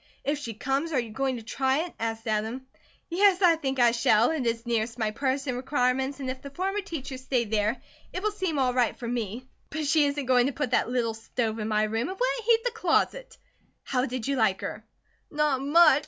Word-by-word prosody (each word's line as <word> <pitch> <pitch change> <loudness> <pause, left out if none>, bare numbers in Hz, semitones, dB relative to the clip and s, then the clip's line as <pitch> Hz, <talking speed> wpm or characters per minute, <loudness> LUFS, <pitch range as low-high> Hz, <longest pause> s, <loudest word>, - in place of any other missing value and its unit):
"If 290 +1 -1
she 230 -6 -6
comes, 270 +7 -1
are 265 - +3
you 235 -2 -4
going 265 +3 -1
to 230 - -9
try 265 +7 0
it?" 350 - -10
asked 225 0 -3
Adam. 220 +4 -1 0.4
"Yes, 380 +2 +3
I 340 -2 +7
think 270 -4 -3
I 240 -1 +6
shall. 230 +1 +3
It 290 -7 -1
is 230 0 -1
nearest 230 0 -1
my 220 -2 0
purse 270 +4 -1
and 255 -3 -2
requirements 265 +1 0
and 270 - -4
if 255 0 -4
the 280 - -8
former 385 +8 -2
teacher 285 -9 -6
stayed 250 -4 -1
there, 215 +3 +1 0.3
it 370 - -5
will 425 - +1
seem 375 -7 -2
all 255 -2 +2
right 245 -3 +1
for 235 - -6
me; 235 +1 -3 0.2
but 315 -1 -3
she 290 +1 +4
isn't 285 -1 -2
going 250 0 +4
to 280 - -2
put 290 -3 -2
that - - +2
little 240 -2 0
stove 225 0 -3
in 215 - -2
my 215 -1 +2
room. 225 +6 -1
It 380 - -6
wouldn't - - 0
heat 455 -1 +5
the - - 0
closet. - - 0 0.5
How 255 0 0
did 250 -2 -4
you 275 -1 0
like 210 -5 +2
her?" - - -5 0.5
"Not 295 -3 +1
much!" 290 0 +6
260 Hz, 230 wpm, -27 LUFS, 230-300 Hz, 0.5 s, I